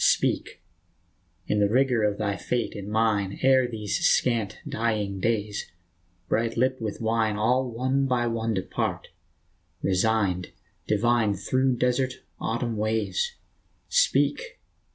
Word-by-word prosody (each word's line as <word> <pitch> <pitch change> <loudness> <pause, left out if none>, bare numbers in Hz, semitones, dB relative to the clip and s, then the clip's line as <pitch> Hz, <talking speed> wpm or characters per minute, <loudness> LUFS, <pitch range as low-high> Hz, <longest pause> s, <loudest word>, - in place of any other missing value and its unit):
Speak! - - +1 0.8
in 105 - 0
the 100 -1 +3
rigor 125 -1 +2
of 105 -1 +1
thy 100 -2 -1
fate 120 +2 -2
and 100 -1 -7
mine, 105 -3 +1
Ere 130 -1 +5
these 105 -4 -3
scant, 115 -5 +2
dying 105 -4 -1
days, 105 -2 -1 0.6
bright 115 +1 0
lipped 130 +1 +1
with 110 -2 -4
wine, 110 -1 +1
All 125 +4 +2
one 130 +3 0
by 125 -2 +1
one 115 -1 -1
depart, 95 - -3 0.7
resigned, 95 -2 +1 0.3
divine, 110 0 +2
Through 130 +7 +1
desert, 125 +1 +1 0.3
autumn 115 0 -2
ways. 110 - -1 0.5
Speak - - +1
115 Hz, 120 wpm, -26 LUFS, 105-125 Hz, 0.8 s, Ere